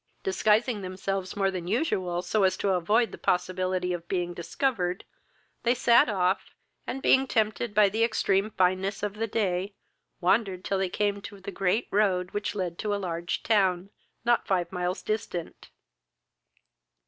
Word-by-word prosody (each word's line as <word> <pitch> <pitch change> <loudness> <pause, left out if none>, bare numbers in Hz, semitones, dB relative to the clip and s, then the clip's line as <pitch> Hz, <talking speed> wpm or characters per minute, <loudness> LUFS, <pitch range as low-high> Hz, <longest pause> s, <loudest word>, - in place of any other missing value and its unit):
Disguising 225 - +2
themselves 185 0 -3
more 195 -1 +1
than 180 -2 -5
usual, 185 - 0
so 205 +4 0
as 190 - +3
to 200 - 0
avoid 210 +6 +2
the - - -9
possibility 185 0 0
of 170 -1 -6
being 175 -2 -1
discovered, 180 +1 -2 0.6
they 240 +1 +2
sat 235 -1 +5
off; 190 -1 0 0.3
and, 270 - -4
being 265 0 +4
tempted 220 -1 0
by 210 -1 +6
the 220 +4 0
extreme 205 -3 +1
fineness 190 +1 0
of 205 -1 -1
the 225 +2 -2
day, 200 -2 -1 0.4
wandered 190 0 +1
till 195 - 0
they 190 -1 0
came 200 +1 -1
to 200 -1 -9
the 195 +1 -7
great 195 +4 0
road 190 -3 +1
which 205 0 -3
led 180 -4 -3
to 210 -1 -1
a - - -1
large 175 -3 -3
town, 195 -3 +2 0.3
not 240 0 +2
five 180 -3 0
miles 180 0 -2
distant. 215 -6 -4
195 Hz, 160 wpm, -27 LUFS, 180-215 Hz, 0.6 s, by